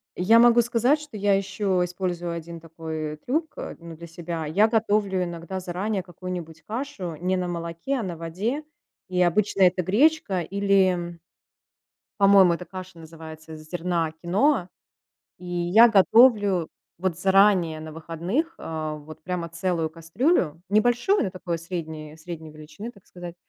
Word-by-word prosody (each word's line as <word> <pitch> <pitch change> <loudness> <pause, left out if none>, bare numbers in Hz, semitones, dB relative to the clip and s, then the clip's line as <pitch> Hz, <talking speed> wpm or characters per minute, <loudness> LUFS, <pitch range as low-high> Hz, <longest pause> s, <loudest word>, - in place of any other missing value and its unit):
Я 220 +6 +5
могу 240 0 +6
сказать, 240 +5 +2
что 295 -5 -11
я 205 0 +2
еще 195 -1 -1
использую 175 -1 -3
1 170 0 -7
такой 160 -2 -6
трюк, 310 - -2
а, - - -6
ну, 170 -1 -10
для 170 +2 -10
себя, 165 -1 -5
я 200 +8 +4
готовлю 210 -4 +1
иногда 175 +1 -5
заранее 190 +3 -2
какую-нибудь 175 -2 -8
кашу 215 - -5
не 185 +3 0
на 180 -1 -2
молоке, 170 +7 -4
а - - -3
на 175 -4 -5
воде, 195 - -3 0.5
и 180 -1 0
обычно 195 +3 +1
это 180 0 +4
гречка 215 - +2
или, 195 +2 +2
м 175 -1 -4 1.0
по-моему, 195 -3 +7
эта 180 +1 -5
каша 185 0 -9
называется 160 0 -11
из 155 0 -11
зерна 170 -1 -1
киноа, 190 +3 +2 0.7
и 180 - -13
я 175 +6 +5
готовлю 205 -4 +5 0.3
вот 180 0 -1
заранее 190 -4 +4
на 155 0 -8
выходных, 170 - -3
а, 155 -1 -4
вот 150 +1 -12
прямо 175 0 -4
целую 170 -1 -2
кастрюлю, 165 - 0
небольшую, 240 - +2
но - - -2
такой 180 -2 -4
средней 160 -3 -6
средней 160 -1 -8
величины, 155 +8 -9
так 200 -5 -21
сказать, 175 -1 -9
180 Hz, 150 wpm, -25 LUFS, 165-200 Hz, 1.0 s, по-моему